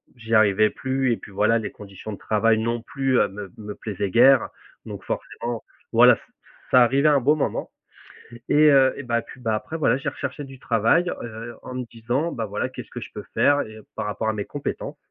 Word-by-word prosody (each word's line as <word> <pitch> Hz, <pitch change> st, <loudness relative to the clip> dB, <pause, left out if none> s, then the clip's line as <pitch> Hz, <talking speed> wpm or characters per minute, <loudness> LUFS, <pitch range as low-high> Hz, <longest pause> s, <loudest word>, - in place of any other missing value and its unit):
j'y 115 Hz, -1 st, -6 dB
arrivais 110 Hz, -1 st, +5 dB
plus 130 Hz, -1 st, -1 dB
et 115 Hz, -, +1 dB
puis 105 Hz, -, -13 dB
voilà, 110 Hz, +4 st, +2 dB
les 110 Hz, -, -5 dB
conditions 100 Hz, +1 st, -9 dB
de -, -, -7 dB
travail 110 Hz, +1 st, +2 dB
non 115 Hz, +1 st, -1 dB
plus, 135 Hz, +1 st, 0 dB
heu, -, -, +3 dB
me 100 Hz, -1 st, -8 dB
me 105 Hz, -1 st, -7 dB
plaisaient 100 Hz, -2 st, -4 dB
guère. 130 Hz, +2 st, +6 dB, 0.4 s
Donc -, -, -8 dB
forcément, 120 Hz, -1 st, -4 dB, 0.3 s
voilà, -, -, +7 dB
c -, -, -17 dB, 0.5 s
c'est -, -, +6 dB
arrivé 135 Hz, +4 st, +5 dB
à 150 Hz, -, +5 dB
un 140 Hz, -, +4 dB
bon 145 Hz, +5 st, +4 dB
moment 150 Hz, -, -2 dB, 0.8 s
et -, -, +2 dB, 0.2 s
heu 135 Hz, -1 st, +5 dB
et 145 Hz, -, -6 dB
bah, 120 Hz, -2 st, 0 dB
puis 130 Hz, -, -14 dB
bah, 115 Hz, -3 st, -1 dB
après 155 Hz, +9 st, -5 dB
voilà, 155 Hz, -, +3 dB
j'ai 140 Hz, -, -2 dB
recherché 140 Hz, +2 st, -5 dB
du 135 Hz, -1 st, -11 dB
travail, 120 Hz, -, +2 dB
heu, 115 Hz, 0 st, -7 dB
en 130 Hz, -, -7 dB
me 130 Hz, -, -3 dB
disant, 120 Hz, +8 st, -2 dB
bah, 115 Hz, -, -3 dB
voilà: 105 Hz, +5 st, -2 dB
«Qu'est-ce 130 Hz, -, -9 dB
que -, -, -7 dB
je -, -, -9 dB
peux -, -, -7 dB
faire?» 145 Hz, 0 st, +4 dB
et 110 Hz, -, -8 dB
heu -, -, -10 dB
et -, -, -25 dB
par -, -, -3 dB
rapport 105 Hz, +1 st, -3 dB
à -, -, 0 dB
mes 105 Hz, -2 st, -4 dB
compétences. 145 Hz, -1 st, -5 dB
115 Hz, 230 wpm, -23 LUFS, 110-135 Hz, 0.8 s, voilà